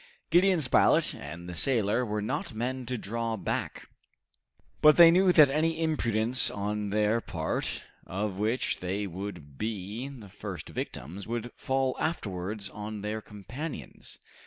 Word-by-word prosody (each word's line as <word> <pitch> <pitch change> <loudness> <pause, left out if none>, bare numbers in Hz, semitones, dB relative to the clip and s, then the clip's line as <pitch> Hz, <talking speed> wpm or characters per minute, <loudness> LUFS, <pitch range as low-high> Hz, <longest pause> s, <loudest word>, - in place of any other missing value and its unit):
Gideon 180 +1 +5
Spilett 125 -5 +4
and 85 +4 -8
the 90 - -6
sailor 115 +1 +2
were 105 -2 -2
not 110 - -3
men 125 +2 -3
to 125 - -2
draw 115 +1 -3
back, - - -3 0.9
but 150 -1 +7
they 170 -1 +10
knew 185 +2 +5
that 150 -5 +7
any 160 +2 +1
imprudence 125 -7 +3
on 105 +1 -2
their 105 +3 +2
part, 80 -6 -3 0.2
of 100 +1 -3
which 110 +5 0
they 95 +3 -2
would 90 -7 -7
be 110 +3 -3
the 125 -7 -10
first 95 -4 -7
victims, 90 +11 -6
would 120 +1 -3
fall 130 -1 0
afterwards 100 - -3
on 105 +1 -6
their 105 +1 -3
companions. 120 +10 -7
110 Hz, 140 wpm, -29 LUFS, 100-130 Hz, 0.9 s, they